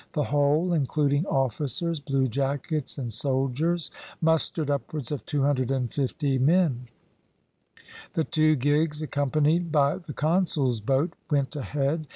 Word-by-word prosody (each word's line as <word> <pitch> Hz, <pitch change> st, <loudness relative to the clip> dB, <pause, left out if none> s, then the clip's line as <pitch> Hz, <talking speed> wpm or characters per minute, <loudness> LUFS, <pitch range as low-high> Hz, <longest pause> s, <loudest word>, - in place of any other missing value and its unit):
The 150 Hz, -, +1 dB
whole, 145 Hz, +5 st, +2 dB
including 145 Hz, +1 st, +1 dB
officers, 140 Hz, +5 st, -1 dB
bluejackets 135 Hz, +1 st, -1 dB
and 120 Hz, -5 st, -4 dB
soldiers, 135 Hz, +7 st, 0 dB, 0.3 s
mustered 160 Hz, -2 st, +1 dB
upwards 140 Hz, -1 st, -3 dB
of 140 Hz, -7 st, -3 dB
250 135 Hz, -1 st, 0 dB
men. 140 Hz, -4 st, +2 dB, 1.3 s
The 160 Hz, -, +1 dB
two 155 Hz, 0 st, +3 dB
gigs, 150 Hz, +3 st, +1 dB
accompanied 155 Hz, +3 st, +1 dB
by 145 Hz, +1 st, +3 dB
the 170 Hz, -5 st, -9 dB
consul's 150 Hz, -7 st, +1 dB
boat, 135 Hz, -, +1 dB, 0.2 s
went 140 Hz, -1 st, 0 dB
ahead. 145 Hz, +2 st, -2 dB
145 Hz, 110 wpm, -26 LUFS, 135-155 Hz, 1.3 s, two